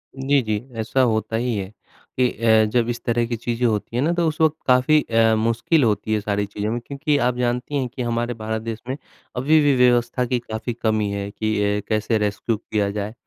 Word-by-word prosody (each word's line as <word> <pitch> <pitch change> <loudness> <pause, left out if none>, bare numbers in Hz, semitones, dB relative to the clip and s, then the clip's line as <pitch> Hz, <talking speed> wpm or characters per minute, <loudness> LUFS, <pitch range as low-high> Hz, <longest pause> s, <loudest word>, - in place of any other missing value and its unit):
जी, 135 +1 +2
जी। 110 -3 -1 0.2
ऐसा 110 +4 +1
होता 110 -2 0
ही 120 0 0
है 95 -1 -4 0.5
कि 125 -1 +4
अ, 110 -2 +3
जब 120 0 +1
इस 120 - -4
तरह 120 0 +1
की 120 - -2
चीज़ें 120 +1 -2
होती 110 +1 -2
हैं 125 - +1
ना, 165 - +2
तो 170 -1 +1
उस 155 -1 -3
वक़्त 160 -1 +4
काफ़ी 130 +4 +4
अ, 115 -2 +3
मुश्किल 115 +7 +2
होती 110 -1 0
है, 110 - +2
सारी 100 0 -1
चीज़ों 105 +1 -4
में 120 - -1
क्योंकि 145 +1 0
आप 125 - 0
जानती 125 +3 -1
हैं 130 -3 0
कि 130 - -4
हमारे 120 0 -1
भारत 110 -1 -4
देश 115 -1 -5
में, 130 - -3 0.4
अभी 145 +6 +3
भी 145 -2 +3
व्यवस्था 125 0 +3
की 125 0 0
काफ़ी 115 0 -5
कमी 110 -3 0
है 100 0 -4
कि 110 +1 -2 0.2
अ, - - -5
कैसे 110 +1 +1
रेस्क्यू 105 +2 -1
किया 105 -2 -2
जाए? 105 +1 -4
115 Hz, 220 wpm, -22 LUFS, 110-125 Hz, 0.5 s, कि